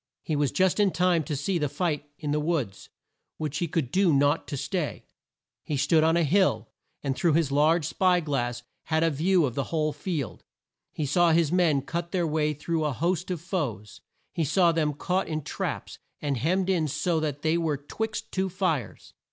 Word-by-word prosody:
He 155 - -1
was 145 -2 +1
just 190 +1 +2
in 205 -1 +5
time 175 -1 +2
to 150 - -2
see 170 +6 -1
the 150 -2 0
fight 150 -3 -2
in 150 -2 -3
the 150 - +1
woods, 150 - -2 0.5
which 150 -2 -3
he 175 - 0
could 150 -6 -2
do 190 0 +3
naught 145 +2 +2
to 145 - -4
stay. 175 +1 -3 0.6
He 150 - -2
stood 155 +3 +3
on 165 +1 +3
a 170 - +3
hill, 190 +6 +2 0.3
and 135 -2 -1
through 170 +1 +2
his 155 -3 +2
large 155 +3 +3
spy 180 +2 +2
glass 120 -6 -2 0.2
had 160 0 +1
a 165 - +3
view 170 +3 +2
of 125 - -2
the 140 +2 -2
whole 155 -2 -1
field. 145 - -4 0.5
He 155 - -3
saw 170 +4 +3
his 165 -2 +3
men 165 -7 +3
cut 170 +1 -4
their 180 -2 +1
way 150 -1 0
through 160 +2 -2
a 150 -2 0
host 175 +6 -1
of 175 -4 -3
foes. 130 - -4 0.3
He 165 - 0
saw 170 +3 +3
them 155 -2 0
caught 180 +5 -1
in 155 -2 -3
traps, 145 - -4 0.2
and 145 -2 -1
hemmed 180 +9 +1
in 165 -4 +1
so 160 +3 0
that 145 -2 -3
they 160 +1 +2
were 160 -4 0
'twixt 215 +10 -5
two 190 0 -1
fires. 180 -7 -2
160 Hz, 200 wpm, -27 LUFS, 145-175 Hz, 0.6 s, in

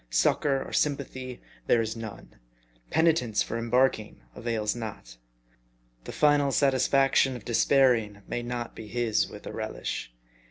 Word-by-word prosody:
Succor 135 - +1
or - - -10
sympathy 130 -3 -2 0.2
there 120 - +4
is 110 0 -2
none. 110 - -9 0.5
Penitence 155 -10 +2
for 115 - -4
embarking 115 - +1
avails 110 - -2
not. 105 - -8 0.9
The - - -6
final 145 -2 +3
satisfaction 135 -1 +3
of 120 - -10
despair 130 +2 +4
ing 105 -3 -5
may 120 - -3
not 120 0 -5
be 110 - -9
his 115 -1 0
with - - -11
a - - -6
relish. - - -4
120 Hz, 135 wpm, -27 LUFS, 110-135 Hz, 0.9 s, there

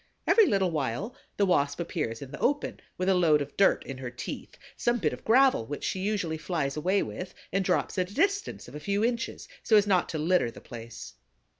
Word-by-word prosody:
Every 445 -3 +6
little 195 -4 +2
while 150 - -2 0.2
the 200 - +3
Wasp 145 -5 +1
appears 150 -9 -3
in 135 - -10
the 150 - -7
open 290 +3 0 0.2
with 185 - -1
a 195 - +5
load 165 -5 +4
of 145 0 -5
dirt 195 - +4
in 135 -1 -7
her 130 -2 -5
teeth, 120 - -7 0.2
some 240 0 +1
bit 225 - 0
of - - -9
gravel 255 - +4
which 145 - -5
she 190 - -1
usually 185 -5 -1
flies 150 -4 -2
away 185 +6 +1
with 185 - -7 0.2
and 195 0 +2
drops 185 0 0
at 180 0 0
a - - -11
distance 395 +5 0
of 120 - -12
a 150 - -6
few 200 +6 0
inches, 235 0 -2
so 220 - +3
as 205 -1 +6
not 190 -3 +2
to 160 - -3
litter 160 -4 +2
the 115 - -11
place. 115 -1 -9
180 Hz, 225 wpm, -28 LUFS, 145-205 Hz, 0.2 s, Every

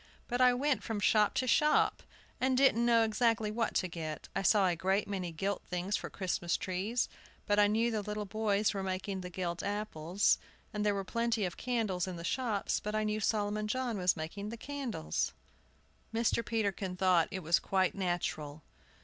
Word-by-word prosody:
"But 245 +1 -1
I 250 0 +7
went 285 +2 +1
from 220 -3 -3
shop 210 0 +3
to 255 - +1
shop, 300 +4 +3 0.4
and 260 0 +2
didn't 240 -3 +4
know 230 -1 +5
exactly 225 -1 +1
what 230 +1 -1
to 185 - +1
get. 160 -3 -6
I - - +1
saw 200 +1 +4
a 180 -2 +2
great 190 +4 0
many 185 -4 -3
gilt 195 +4 -2
things 180 +3 -2
for - - -4
Christmas 175 -2 -1
trees; 200 +5 -1 0.4
but 205 0 +2
I 205 - +6
knew 225 +3 +2
the 215 -2 -1
little 210 +1 -4
boys 210 0 +1
were 195 - -2
making 190 0 -3
the 180 - -6
gilt 175 -1 -3
apples; 200 -3 0 0.3
there 210 -1 0
were 195 - -2
plenty 230 0 0
of 175 - -4
candles 215 -8 -1
in 185 - -4
the 170 - -7
shops, 220 +1 0
but 210 +1 -4
I 215 - +1
knew 215 0 -1
Solomon 210 -1 0
John 240 -2 -1
was 180 -1 +2
making 195 +6 -5
the 230 - -6
candles." 255 - -3 0.8
Mr. 230 0 +1
Peterkin 200 -5 -2
thought 180 -3 +4
it 190 -3 -5
was 165 +2 +3
quite 190 -1 +1
natural. 160 -5 -3
205 Hz, 185 wpm, -32 LUFS, 185-225 Hz, 0.8 s, I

